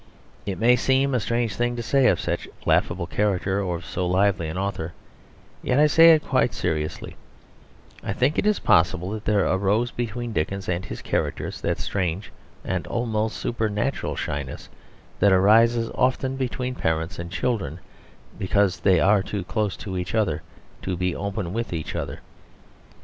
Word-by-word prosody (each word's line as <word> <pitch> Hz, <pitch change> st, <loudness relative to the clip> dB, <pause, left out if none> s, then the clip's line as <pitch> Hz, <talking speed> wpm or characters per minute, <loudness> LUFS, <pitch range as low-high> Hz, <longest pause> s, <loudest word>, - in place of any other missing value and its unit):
It 95 Hz, -, -2 dB
may 120 Hz, +2 st, +5 dB
seem 135 Hz, +2 st, +2 dB
a 125 Hz, -, +2 dB
strange 115 Hz, 0 st, -1 dB
thing 120 Hz, +2 st, 0 dB
to 120 Hz, -, -4 dB
say 135 Hz, +2 st, +3 dB
of -, -, +3 dB
such -, -, -2 dB, 0.2 s
laughable 85 Hz, 0 st, +2 dB
characters 100 Hz, 0 st, 0 dB
and 95 Hz, -, -3 dB
of 85 Hz, -1 st, -4 dB
so 90 Hz, +3 st, -2 dB
lively 95 Hz, -1 st, +2 dB
an 80 Hz, -, -5 dB
author, 95 Hz, -4 st, -3 dB, 0.7 s
yet 125 Hz, -, 0 dB
I 150 Hz, -, +7 dB
say 165 Hz, +2 st, +8 dB
it 155 Hz, -, -3 dB
quite 130 Hz, -2 st, +1 dB
seriously; 75 Hz, -3 st, -3 dB, 0.9 s
I -, -, -3 dB
think 130 Hz, +9 st, +1 dB
it 210 Hz, 0 st, +2 dB
possible 90 Hz, +3 st, +3 dB
that 110 Hz, 0 st, -5 dB
there 105 Hz, -3 st, +2 dB
arose 100 Hz, +5 st, +1 dB
between 120 Hz, 0 st, -4 dB
Dickens 95 Hz, +3 st, -2 dB
and 90 Hz, +1 st, -1 dB
his -, -, -7 dB
characters -, -, -2 dB
that -, -, 0 dB
strange 95 Hz, 0 st, -2 dB, 0.3 s
and 95 Hz, -2 st, -2 dB
almost 110 Hz, -2 st, -1 dB
supernatural 110 Hz, +2 st, -1 dB
shyness 70 Hz, -2 st, -5 dB, 0.5 s
that 100 Hz, -, +5 dB
arises 115 Hz, +5 st, +4 dB
often 130 Hz, +1 st, +1 dB
between 130 Hz, -1 st, -2 dB
parents 80 Hz, -3 st, -2 dB
and 85 Hz, 0 st, -5 dB
children; 90 Hz, -, -2 dB, 0.6 s
because 95 Hz, 0 st, +1 dB
they 95 Hz, -3 st, +4 dB
are 100 Hz, +2 st, +4 dB
too 100 Hz, 0 st, -4 dB
close 105 Hz, +2 st, -2 dB
to 95 Hz, -3 st, -4 dB
each 90 Hz, +5 st, -4 dB
other 95 Hz, -9 st, +1 dB, 0.4 s
to 95 Hz, -2 st, -3 dB
be 90 Hz, 0 st, -1 dB
open 100 Hz, -3 st, -3 dB
with 115 Hz, -3 st, -3 dB
each 80 Hz, -2 st, -4 dB
other. -, -, -4 dB
100 Hz, 165 wpm, -24 LUFS, 90-120 Hz, 0.9 s, say